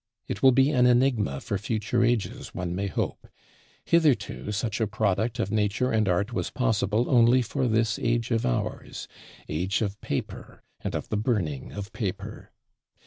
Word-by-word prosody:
It - - -4
will 135 - +7
be 135 +3 +4
an 125 -3 +4
enigma 120 - +2
for 100 - -2
future 110 +2 0
ages, 120 -3 -1
one 90 -1 -3
may 100 +2 -2
hope; 95 - -3 0.6
hitherto 135 -11 +2
such 110 +1 -2
a 110 - +2
product 110 +1 0
of 100 - -1
Nature 110 +4 +1
and 110 -3 +2
Art 100 +7 0
was - - -2
possible 115 -2 +1
only 125 0 +5
for 125 +3 -1
this 110 -1 +1
age 120 0 0
of 115 -1 +1
ours - - -3 0.4
Age 95 +7 -1
of 100 -1 -4
Paper, - - -5 0.2
and - - -4
of - - -4
the 105 - 0
Burning 100 - -1
of 100 +1 -7
Paper. 100 -5 -5
110 Hz, 165 wpm, -26 LUFS, 100-120 Hz, 0.6 s, will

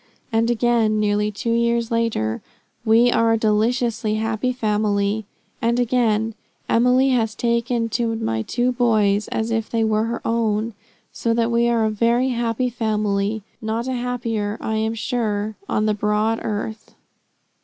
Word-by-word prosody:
And 225 +1 +2
again, 230 -2 +2
nearly 210 0 +1
two 210 +3 -3
years 235 0 +1
later: 230 - 0 0.4
"We 230 +2 +4
are 230 -1 +3
a - - +3
deliciously 225 +1 +1
happy 220 +3 -1
family;" 210 -3 0 0.3
and 235 +1 +1
again, 225 -3 +1 0.3
"Emily 250 +3 +3
has 225 -4 +1
taken 235 0 0
to 225 +1 -1
my 110 - -1
two 245 - 0
boys 215 -4 +2
as 225 +1 -2
if 225 -1 -1
they 230 -1 0
were 220 0 +1
her 235 +1 -3
own; 225 -1 0 0.4
so 230 -1 -1
that 230 0 +1
we 235 0 +3
are 230 -2 +2
a 215 - +1
very 235 +4 +2
happy 240 0 -1
family; 210 -2 -1 0.2
not 225 +2 -2
a 260 - -1
happier, 235 -4 -2
I 220 0 -2
am 220 +1 -1
sure, 215 -3 -2
on 215 - +1
the 215 - +2
broad 210 +2 0
earth." 215 +1 -5
225 Hz, 155 wpm, -21 LUFS, 215-235 Hz, 0.4 s, We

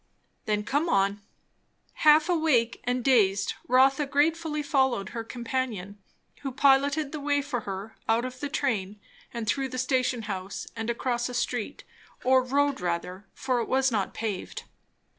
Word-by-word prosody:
"Then 210 -1 0
come 290 +9 0
on." 200 -2 +1 0.7
Half 305 +1 +5
awake, 310 -10 +2
and 250 0 0
dazed, 205 -7 +3
Rotha 265 +3 +4
gratefully 300 +2 +1
followed 265 -9 +1
her 230 - -5
companion; 230 -5 -4 0.4
who 270 - -4
piloted 280 +2 +3
the 310 - -5
way 285 0 0
for 275 -3 -2
her 195 +3 -6
out 230 +2 +2
of 255 0 -7
the 290 - -3
train 210 -9 -2 0.3
and 235 -2 -4
through 265 +4 0
the 255 - -6
station 255 -2 0
house 195 -2 -5
and 225 0 -4
across 240 0 -1
a 250 - -6
street, 245 +2 -2 0.4
or 260 0 +5
road 280 +2 0
rather, 180 +2 -3
for 255 -2 0
it - - -4
was 265 0 +2
not 205 -4 -1
paved. 215 -4 -4
255 Hz, 155 wpm, -27 LUFS, 220-280 Hz, 0.7 s, Half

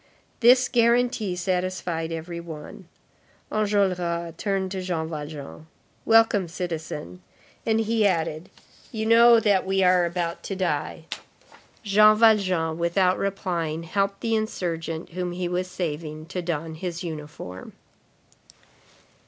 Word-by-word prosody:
This 250 +1 +6
guarantee 235 -4 +2
satisfied 180 -2 -2
every 165 +1 -5
one. 160 -3 -9 0.6
Enjolras 180 -5 0
turned 195 -2 -1
to 190 -1 -3
Jean 170 -3 -2
Valjean. 150 0 -7 0.4
"Welcome, 225 -4 +4
citizen." 160 - -5 0.5
And 225 0 +3
he 220 -1 +2
added: 165 -3 -2 0.4
"You 220 -3 -3
know 230 +1 +7
that 205 -4 +2
we 190 0 +1
are 180 -1 +4
about 170 -1 -3
to 195 - -3
die." 185 -2 -2 0.8
Jean 215 +1 +6
Valjean, 185 -8 +3
without 180 +2 +2
replying, 170 -5 -2
helped 195 +3 -1
the 225 -1 -1
insurgent 170 -7 -3
whom 180 0 -4
he 180 0 -2
was 180 +1 -2
saving 155 -3 -4
to 180 -1 -3
don 165 -2 -3
his 170 +1 -5
uniform. 150 - -8
180 Hz, 120 wpm, -25 LUFS, 165-205 Hz, 0.8 s, know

